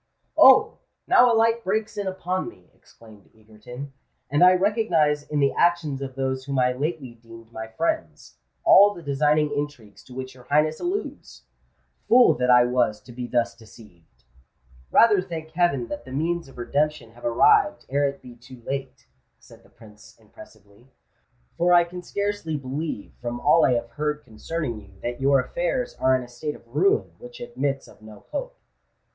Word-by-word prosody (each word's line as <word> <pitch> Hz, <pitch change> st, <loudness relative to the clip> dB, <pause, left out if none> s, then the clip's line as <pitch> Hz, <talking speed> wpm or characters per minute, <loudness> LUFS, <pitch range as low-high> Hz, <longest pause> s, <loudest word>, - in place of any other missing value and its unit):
"Oh! -, -, +6 dB, 0.3 s
now 245 Hz, 0 st, +5 dB
a -, -, +3 dB
light 230 Hz, +1 st, +2 dB
breaks 215 Hz, +3 st, -2 dB
in 205 Hz, -1 st, -3 dB
upon 185 Hz, 0 st, -3 dB
me," 90 Hz, -1 st, -20 dB
exclaimed 110 Hz, -3 st, -19 dB
Egerton; 110 Hz, +6 st, -11 dB, 0.4 s
"and 145 Hz, +4 st, +3 dB
I 180 Hz, 0 st, +8 dB
recognise 180 Hz, -7 st, +1 dB
in 150 Hz, 0 st, -3 dB
the 140 Hz, -1 st, +2 dB
actions 165 Hz, -6 st, +1 dB
of 135 Hz, -1 st, -6 dB
those 130 Hz, -1 st, -2 dB
whom 140 Hz, -1 st, -3 dB
I 125 Hz, 0 st, +3 dB
lately 140 Hz, -1 st, -4 dB
deemed 115 Hz, 0 st, -15 dB
my 110 Hz, -1 st, -7 dB
friends, 315 Hz, -, -4 dB, 0.2 s
all 205 Hz, +1 st, +6 dB
the 170 Hz, -, -11 dB
designing 150 Hz, +1 st, +1 dB
intrigues 145 Hz, -8 st, -6 dB
to 125 Hz, -, -13 dB
which 130 Hz, 0 st, -6 dB
your 125 Hz, -1 st, -17 dB
Highness 155 Hz, +2 st, +1 dB
alludes! 380 Hz, +4 st, -5 dB, 0.7 s
Fool 245 Hz, +1 st, +6 dB
that 125 Hz, 0 st, +1 dB
I 125 Hz, -1 st, +7 dB
was 120 Hz, -4 st, 0 dB
to 125 Hz, -, -14 dB
be 120 Hz, 0 st, -6 dB
thus 120 Hz, -1 st, 0 dB
deceived!" 95 Hz, -, -19 dB, 0.7 s
"Rather 215 Hz, -4 st, +5 dB
thank 160 Hz, -3 st, -7 dB
heaven 160 Hz, -8 st, 0 dB
that 195 Hz, -, -6 dB
the 130 Hz, -, -12 dB
means 165 Hz, +4 st, -2 dB
of 135 Hz, -, -16 dB
redemption 145 Hz, 0 st, -2 dB
have 120 Hz, +1 st, -18 dB
arrived 160 Hz, +12 st, +3 dB
ere 140 Hz, +2 st, +1 dB
it 140 Hz, -, -11 dB
be 125 Hz, -1 st, -12 dB
too 120 Hz, 0 st, -15 dB
late," 135 Hz, -1 st, -5 dB, 0.3 s
said -, -, -18 dB
the -, -, -23 dB
Prince, 105 Hz, -1 st, -18 dB
impressively; 105 Hz, +1 st, -18 dB, 0.7 s
"for 175 Hz, +1 st, +3 dB
I 175 Hz, -, +6 dB
can 180 Hz, +1 st, -8 dB
scarcely 200 Hz, -4 st, -3 dB
believe, 140 Hz, -3 st, -5 dB
from 120 Hz, 0 st, -4 dB
all 160 Hz, +5 st, +4 dB
I 125 Hz, -, +4 dB
have 120 Hz, -1 st, -3 dB
heard 150 Hz, +3 st, -3 dB
concerning 120 Hz, +1 st, -5 dB
you, 95 Hz, -1 st, -19 dB
that 120 Hz, +2 st, -4 dB
your 135 Hz, 0 st, +4 dB
affairs -, -, -2 dB
are 130 Hz, 0 st, +3 dB
in 130 Hz, -, -2 dB
a -, -, -11 dB
state 135 Hz, +5 st, -6 dB
of -, -, -17 dB
ruin 135 Hz, -, +1 dB
which 120 Hz, 0 st, -12 dB
admits 135 Hz, +3 st, -3 dB
of -, -, -18 dB
no 110 Hz, -1 st, -14 dB
hope." -, -, -5 dB
140 Hz, 175 wpm, -24 LUFS, 120-170 Hz, 0.7 s, I